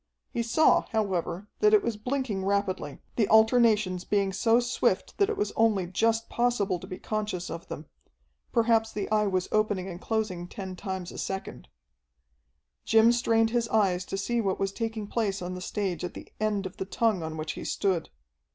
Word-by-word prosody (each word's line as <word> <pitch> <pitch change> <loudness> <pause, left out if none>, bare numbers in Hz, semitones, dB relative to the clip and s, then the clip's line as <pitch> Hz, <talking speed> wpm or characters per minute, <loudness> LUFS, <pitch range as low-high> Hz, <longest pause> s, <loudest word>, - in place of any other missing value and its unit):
He 235 - -1
saw, 235 +7 +4
however, 195 -4 -1
that 425 0 +6
it 410 - +3
was 230 - -1
blinking 230 -3 -2
rapidly, 195 -7 -1 0.2
the 215 -4 +3
alternations 220 -5 +4
being 200 -2 0
so 225 +4 +3
swift 240 -5 0
that 400 0 +4
it 440 - -2
was 415 - -1
only 215 -5 +3
just 225 +5 +1
possible 215 -6 0
to - - -10
be 185 - -6
conscious 210 -5 -3
of 165 - -7
them. 155 - -7 0.7
Perhaps 225 -1 +2
the 205 -2 -3
Eye 210 -1 +3
was 185 -2 0
opening 205 -3 +1
and 180 -2 -7
closing 210 -6 -2
ten 190 0 -7
times 190 -1 -5
a - - -8
second. 190 - -5 1.2
Jim 225 +1 +5
strained 225 -2 +2
his 235 -1 +1
eyes 190 -5 +2
to 195 - -4
see 235 +4 0
what 195 -3 -1
was 195 0 0
taking 225 0 -3
place 200 -2 -1
on 180 0 -5
the 180 - -6
stage 185 -4 -3
at 180 - -5
the - - -9
end 210 -2 0
of 185 - -7
the 190 - -3
tongue 215 -1 +1
on 160 0 -5
which 155 0 -3
he - - -7
stood. 185 -5 -1
205 Hz, 190 wpm, -28 LUFS, 185-225 Hz, 1.2 s, that